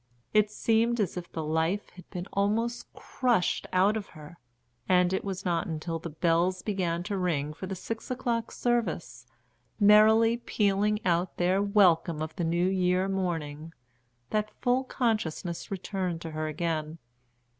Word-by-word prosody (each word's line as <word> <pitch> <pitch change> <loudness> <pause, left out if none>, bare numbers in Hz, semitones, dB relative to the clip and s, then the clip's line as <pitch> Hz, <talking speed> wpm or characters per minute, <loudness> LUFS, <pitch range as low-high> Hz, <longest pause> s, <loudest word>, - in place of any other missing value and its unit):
It 210 -1 +4
seemed 230 +2 +1
as 200 -5 0
if 175 -1 -7
the 160 - -4
life 160 +6 -1
had 180 -1 -15
been 180 0 -5
almost 225 +4 -1
crushed 240 -8 0
out 190 +4 +3
of 215 -3 -4
her, 155 +2 -13 0.5
and 180 0 +4
it 190 - -1
was 190 -1 -5
not 175 +3 0
until 165 0 -3
the 165 - -6
bells 170 +3 +1
began 175 -5 -1
to 200 +1 -3
ring 155 -5 -1
for 190 +4 -7
the 190 - -4
six 225 +5 -6
o'clock 235 -2 -2
service, 180 - -2 0.5
merrily 220 +3 +6
pealing 210 -2 0
out 175 0 +1
their 185 +2 +2
welcome 185 -6 +3
of 160 0 -6
the 175 - -2
new 170 +2 +1
year 185 0 +1
morning, 165 -5 -3 0.6
that 215 0 0
full 250 +1 +1
consciousness 215 - -2
returned 185 -3 -3
to 165 - -6
her 155 0 -3
again. 155 0 -2
185 Hz, 155 wpm, -28 LUFS, 165-210 Hz, 0.6 s, merrily